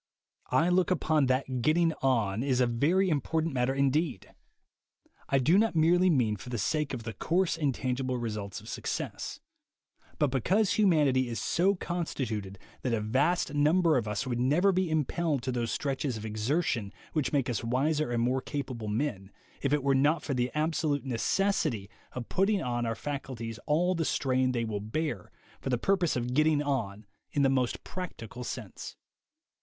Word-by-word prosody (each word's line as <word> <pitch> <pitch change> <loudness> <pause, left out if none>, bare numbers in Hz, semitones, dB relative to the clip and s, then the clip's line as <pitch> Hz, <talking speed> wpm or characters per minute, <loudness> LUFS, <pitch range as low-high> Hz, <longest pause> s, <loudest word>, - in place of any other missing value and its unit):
I 165 - +3
look 180 0 +3
upon 155 -5 +2
it - - -1
that 130 -1 0
'getting 160 +5 +3
on' 115 -6 +1
is 130 -2 +1
a 125 - +5
very 150 +12 +2
important 160 +2 0
matter 130 +1 +1
indeed. 140 - 0 1.0
I 135 - +3
do 160 +9 +4
not 225 -4 +1
mean 170 +1 +4
merely 110 -4 +1
for 110 - -10
the 120 - -2
sake 145 - -1
of 115 - -7
the 115 0 -5
coarse 175 - +1
and 150 -4 +1
tangible 130 0 -2
results 105 -4 -4
of - - -14
success, - - -4 0.8
but 145 -3 +2
because 185 - +2
humanity 145 - +3
is 115 -3 -3
so 190 - +2
con 175 -1 -3
stituted 105 -9 -4 0.2
that 125 -3 0
a - - -1
vast 140 +9 +1
number 155 +3 +3
of 115 -4 0
us 105 +3 -2
would 120 -2 -2
never 155 +10 +3
be 185 -1 0
impelled 155 -2 0
to 130 - -1
those 120 -2 -1
stretches 135 +1 -2
of 110 - -7
exertion 110 - -1 0.2
which 155 -4 0
make 140 -4 +1
us 120 -3 -2
wiser 140 +5 +1
and 120 -1 +1
more 130 +2 +1
capable 130 -7 -5
men, 105 -4 -2 0.3
if 140 - 0
it 150 -2 +2
were 140 0 +3
not 145 +5 +2
for 140 - -2
the 125 -1 0
absolute 155 -2 0
necessity 130 - 0 0.2
of 125 -2 -5
putting 195 +2 +2
on 120 -1 -1
our 115 - -1
faculties 120 -4 -5
all 170 +5 +2
the 165 -2 -1
strain 130 -3 +1
they 120 -2 -1
will 105 -2 -3
bear, 115 - -3 0.3
for - - -4
the 125 - +2
purpose 180 +4 +1
of 125 0 -2
'getting 155 +1 +3
on' 115 -8 -2 0.3
in 145 - +2
the 135 - +4
most 130 -2 0
practical 125 - -7
sense." - - -7
135 Hz, 180 wpm, -29 LUFS, 120-160 Hz, 1.0 s, a